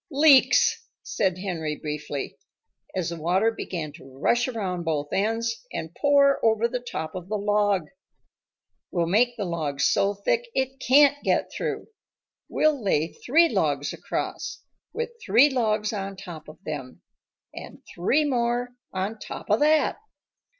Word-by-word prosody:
"Leaks," 300 - +5 0.2
said 185 -3 -1
Henry 165 -5 -3
briefly, 150 -2 -5 0.6
as 180 -3 -1
the 165 -2 -6
water 190 +7 +2
began 170 -8 -5
to 130 0 -14
rush 240 - +2
around 195 -8 -3
both 150 -3 -2
ends 225 +4 -1
and 160 +1 -5
pour 280 -1 +4
over 225 0 +3
the 250 +1 -3
top 160 -10 -5
of 180 -1 -7
the 215 - -1
log. 205 -2 +1 1.1
"We'll 170 -2 0
make 235 +8 +2
the 205 - -2
logs 150 -5 -1
so 200 +1 +2
thick 475 - -1
it 265 0 -1
can't 285 +2 +5
get - - +1
through. - - -3 0.6
We'll 300 -6 +1
lay 165 -4 +1
three 330 +7 +3
logs - - 0
across, - - -4 0.3
with 470 0 -3
three 235 +8 +5
logs 215 -4 0
on 195 -1 -4
top 175 -5 -10
of 155 - -12
them, 140 -5 -7 0.5
and - - -10
three 270 - +2
more 245 -2 0 0.2
on 195 +4 -3
top - - -7
of 210 - +4
that." 305 +1 +3
210 Hz, 145 wpm, -25 LUFS, 170-250 Hz, 1.1 s, Leaks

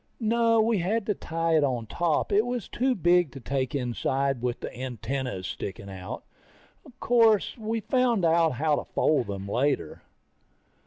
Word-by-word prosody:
No, 230 0 +3
we 220 -1 +2
had 200 +5 0
to 210 - +1
tie 165 -2 -1
it 150 - +3
on 125 -5 -1
top, 165 - 0
it 205 +2 +4
was 245 -4 -3
too 260 0 0
big 175 -4 +3
to 135 - -8
take 130 +1 -2
inside 135 +1 -1
with 125 -1 -2
the - - -6
antennas 125 -4 -4
sticking 100 +1 -6
out. 95 -1 -7 0.8
Course, 225 -4 +3
we 225 0 -3
found 240 -6 +1
out 165 -1 +3
how 150 +4 +1
to - - -3
fold 145 -7 +2
them 100 -1 -5
later. 135 +7 -1
160 Hz, 160 wpm, -27 LUFS, -, 0.8 s, it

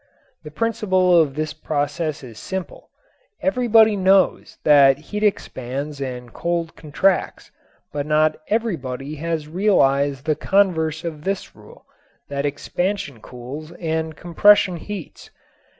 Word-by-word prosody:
The 150 - -9
principle 185 -1 +1
of 140 -4 -1
this 155 0 -3
process 150 0 -3
is 115 -4 -11
simple. 190 -2 -6 0.5
Everybody 230 -5 +4
knows 190 0 +2
that 140 -2 +6
heat 205 +8 -6
expands 140 - -2
and 125 -3 -6
cold 170 -1 -2
contracts, 180 +5 -1 0.4
but 145 0 -3
not 155 0 +2
everybody 155 - -3
has 160 -1 -3
realized 140 -7 +2
the 155 -1 +1
converse 160 -3 +1
of 155 -3 -6
this 195 +2 -3
rule, - - -17 0.4
that 140 0 -1
expansion 150 - -3
cools 135 +8 -9
and 160 -2 -3
compression 180 +1 +4
heats. 195 0 -8
160 Hz, 120 wpm, -21 LUFS, 145-190 Hz, 0.5 s, that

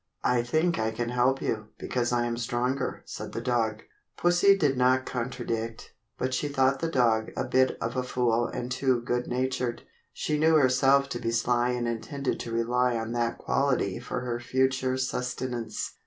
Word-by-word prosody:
"I 125 -1 +3
think 155 +7 +1
I 110 0 +1
can 115 +1 -3
help 125 +2 +1
you, 110 -1 -2
because 120 -1 -1
I 120 -1 +1
am 120 - -1
the 115 - -4
stronger," 125 +3 -1
said - - -7
the - - -2
dog. 115 -3 0 0.3
Pussie 175 +3 +4
did 145 -7 +2
not 130 +1 +3
contradict, 115 -2 -4 0.2
but 130 0 -2
she 135 +4 0
thought 135 -1 +2
the 165 - -1
dog 115 -6 +2
a - - 0
bit 130 0 +2
of 115 +2 -3
a 130 - +1
fool 120 -2 +1
and 125 +1 -5
too 130 -1 +1
good 120 +1 -1
natured. 125 -1 -2 0.3
She 150 -1 -2
knew 160 +1 +4
herself 135 0 +4
to 120 - -3
be 115 - -2
sly 120 +1 +1
and 120 -1 -1
intended 135 +4 -3
to 115 - -5
rely 120 +2 +1
on 115 0 -3
that 120 -1 -1
quality 125 -8 0
for 125 +1 -4
her 120 -1 -3
future 130 +1 +1
sustenance. 125 -3 -3
125 Hz, 185 wpm, -27 LUFS, 120-130 Hz, 0.3 s, Pussie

